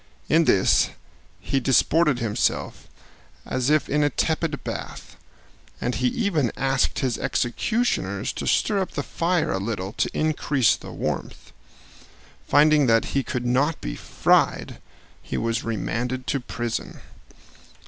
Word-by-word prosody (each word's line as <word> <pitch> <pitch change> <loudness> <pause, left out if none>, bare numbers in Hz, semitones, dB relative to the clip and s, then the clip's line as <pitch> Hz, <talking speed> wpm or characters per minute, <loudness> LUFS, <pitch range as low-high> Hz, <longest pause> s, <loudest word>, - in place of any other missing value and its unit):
In 165 +1 +4
this 95 -8 +4 0.5
he 135 - -1
disported 140 +3 +3
himself 115 -3 -1 0.6
as 130 +1 -1
if 155 0 +3
in 150 +1 +1
a 145 - +3
tepid 160 +1 -1
bath, - - -7 0.6
and 125 - -1
he 125 - +1
even 160 - 0
asked 135 0 +1
his 130 -3 -1
executioners 220 - -1
to - - -5
stir 205 -3 +2
up 190 - -3
the - - -2
fire 170 -1 0
a 95 - -1
little 100 -2 -3
to - - 0
increase 145 -7 +2
the - - -10
warmth. - - -5 1.0
Finding 150 -1 +5
that 115 -1 +3
he 140 - +2
could 125 -2 -4
not 135 +6 +1
be - - -5
fried, - - +1 0.4
he - - -5
was 115 +1 -1
remanded 125 +3 -3
to 140 - -1
prison. 120 -2 -5
135 Hz, 135 wpm, -24 LUFS, 120-155 Hz, 1.0 s, Finding